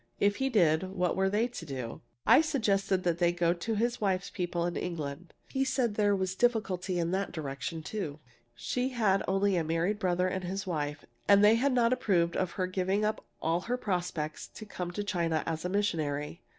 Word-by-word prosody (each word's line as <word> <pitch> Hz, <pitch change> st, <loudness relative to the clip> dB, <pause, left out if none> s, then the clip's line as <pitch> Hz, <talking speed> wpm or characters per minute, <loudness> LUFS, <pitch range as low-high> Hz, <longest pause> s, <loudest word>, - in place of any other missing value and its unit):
If 200 Hz, 0 st, +3 dB
he 270 Hz, 0 st, +1 dB
did, 180 Hz, -5 st, +3 dB
what 180 Hz, -2 st, 0 dB
were 190 Hz, 0 st, +2 dB
they 215 Hz, +4 st, +2 dB
to 240 Hz, -8 st, -8 dB
do? 130 Hz, -6 st, -6 dB, 0.2 s
"I -, -, +7 dB
suggested 200 Hz, -10 st, +1 dB
that 175 Hz, -1 st, 0 dB
they 175 Hz, -1 st, +4 dB
go 175 Hz, -1 st, +2 dB
to 200 Hz, +6 st, -3 dB
his 235 Hz, +3 st, 0 dB
wife's 195 Hz, -1 st, 0 dB
people 175 Hz, -3 st, -2 dB
in 175 Hz, -, -2 dB
England. 160 Hz, -1 st, -4 dB, 0.2 s
He 270 Hz, -, 0 dB
said 255 Hz, -4 st, +1 dB
there 205 Hz, -1 st, +3 dB
was 190 Hz, -1 st, -1 dB
difficulty 195 Hz, -5 st, 0 dB
in 170 Hz, 0 st, 0 dB
that 195 Hz, +1 st, -1 dB
direction, 155 Hz, +1 st, -5 dB
too. 160 Hz, -7 st, -4 dB, 0.4 s
She 250 Hz, -, -1 dB
had 215 Hz, -6 st, +2 dB
only 195 Hz, 0 st, +2 dB
a 170 Hz, -, +1 dB
married 165 Hz, +6 st, 0 dB
brother 180 Hz, -2 st, +1 dB
and 185 Hz, 0 st, -2 dB
his 195 Hz, +3 st, -3 dB
wife, 150 Hz, -4 st, -3 dB, 0.2 s
and 200 Hz, 0 st, +6 dB
they 210 Hz, -, +7 dB
had 255 Hz, +4 st, +2 dB
not 240 Hz, -1 st, +4 dB
approved 185 Hz, -10 st, +1 dB
of 185 Hz, -2 st, -1 dB
her 185 Hz, -, -1 dB
giving 190 Hz, +3 st, 0 dB
up 215 Hz, +1 st, -1 dB, 0.2 s
all 165 Hz, +2 st, +1 dB
her 245 Hz, +5 st, -2 dB
prospects 175 Hz, -8 st, -3 dB
to 215 Hz, -, -10 dB
come 180 Hz, -4 st, -5 dB
to 205 Hz, +4 st, -3 dB
China 170 Hz, -5 st, 0 dB
as 165 Hz, +1 st, -3 dB
a -, -, 0 dB
missionary. 160 Hz, -6 st, -1 dB
185 Hz, 205 wpm, -30 LUFS, 170-210 Hz, 0.4 s, I